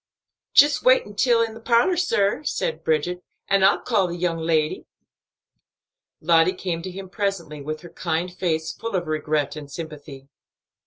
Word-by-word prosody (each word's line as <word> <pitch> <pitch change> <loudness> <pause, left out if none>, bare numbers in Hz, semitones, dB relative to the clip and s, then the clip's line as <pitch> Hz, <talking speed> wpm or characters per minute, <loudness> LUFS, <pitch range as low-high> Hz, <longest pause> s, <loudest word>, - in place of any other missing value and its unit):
"Jist 290 0 +6
walk 255 +1 +5
intil 230 +3 +2
the 225 - -10
parlor, 235 +10 +3
sir," 295 - +1
said 160 - -2
Bridget, 170 +3 0 0.3
"an' 195 -1 +3
I'll 195 - +4
call 205 -6 +1
the 170 - -5
young 170 -1 -1
lady." 160 -2 0 1.3
Lottie 165 +2 +4
came 175 -3 -3
to 185 - -6
him 190 +1 -8
presently, 185 -7 -3
with 155 +2 -5
her 175 - -11
kind 170 +1 -3
face 160 -3 -1
full 230 -3 -5
of 175 -1 -1
regret 155 -2 -1
and 150 -2 -8
sympathy. 145 -3 -9
175 Hz, 155 wpm, -23 LUFS, 155-200 Hz, 1.3 s, Jist